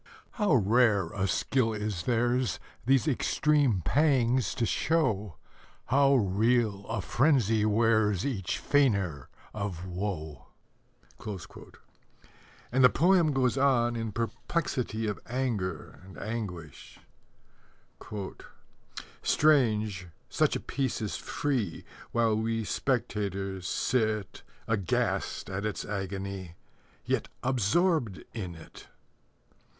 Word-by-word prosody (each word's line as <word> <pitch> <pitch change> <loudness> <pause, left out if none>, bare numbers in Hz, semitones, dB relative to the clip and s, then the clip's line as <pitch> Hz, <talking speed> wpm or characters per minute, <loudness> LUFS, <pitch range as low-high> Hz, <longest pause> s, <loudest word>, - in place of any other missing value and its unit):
How 210 - +2
rare 110 -4 +3
a 100 0 0
skill 115 +4 +1
is 105 -4 -3
theirs 120 +1 +1 0.3
These 135 +2 +3
extreme 145 - +2
pangs 130 - +2
to 115 - 0
show, 105 - 0 0.5
How 140 +1 +4
real 105 -1 +1
a 110 -2 -2
frenzy 115 - +2
wears 110 -3 +2
Each 110 -10 -2
feigner 100 - +1 0.2
of 100 -4 -4
woe! 90 -5 -5 2.2
And 130 +1 +3
the 125 - +9
poem 170 +1 +4
goes 130 -1 +1
on 120 -4 +3
in 115 -1 -3
perplexity 115 - -2
of 105 -2 -2
anger 115 - -3
and 95 0 -13
anguish: 95 -9 -6 2.2
Strange, 110 - +2 0.2
such - - +2
a - - -1
Piece 135 -3 -2
is 105 - -3
free, 125 - -2 0.3
While 115 -2 +2
we 115 0 -1
spectators 100 -6 -2
sit, 110 -4 -1 0.3
Aghast 105 -5 -1
at 95 +1 -4
its 105 -1 -3
agony, 95 -3 -5 0.5
Yet - - 0 0.2
absorbed 130 - +1
in 95 -7 -5
it! 80 - -13
110 Hz, 100 wpm, -29 LUFS, 100-130 Hz, 2.2 s, the